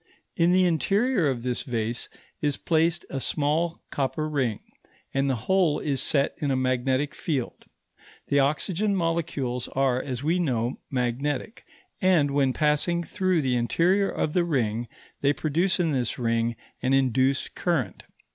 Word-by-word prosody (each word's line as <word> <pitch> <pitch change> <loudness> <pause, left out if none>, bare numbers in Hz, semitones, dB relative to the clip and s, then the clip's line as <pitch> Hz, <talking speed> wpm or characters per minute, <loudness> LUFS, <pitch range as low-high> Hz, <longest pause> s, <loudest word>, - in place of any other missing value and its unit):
In 170 0 +3
the 185 0 +4
interior 195 - +2
of 120 -3 -3
this 125 -1 -1
vase 115 -1 -3 0.3
is 145 -2 0
placed 165 +1 +1
a 135 - -2
small 155 +5 0
copper 145 +3 -1
ring, 130 -8 -1 0.5
and 135 0 +1
the 130 - +1
whole 185 -6 +3
is 140 -3 -1
set 140 -1 +2
in 145 - -1
a 135 - +2
magnetic 130 +2 0
field. 135 -7 -3 0.6
The 140 - +3
oxygen 180 +8 +1
molecules 160 -8 -1
are, 130 -2 +1
as 130 -1 -5
we 165 +4 +1
know, 125 -7 -1
magnetic, 135 - -2 0.4
and 170 -7 +3
when 140 -2 +2
passing 155 +5 +1
through 185 -2 0
the 130 -2 +1
interior 175 +11 +2
of 150 - -2
the 180 - +3
ring 120 -8 -1 0.3
they 140 +1 +3
produce 170 +7 0
in 165 -3 +2
this 125 -5 -1
ring 115 -1 0 0.3
an 130 +1 +1
induced 130 0 +2
current. 150 - -1
145 Hz, 150 wpm, -26 LUFS, 130-170 Hz, 0.6 s, the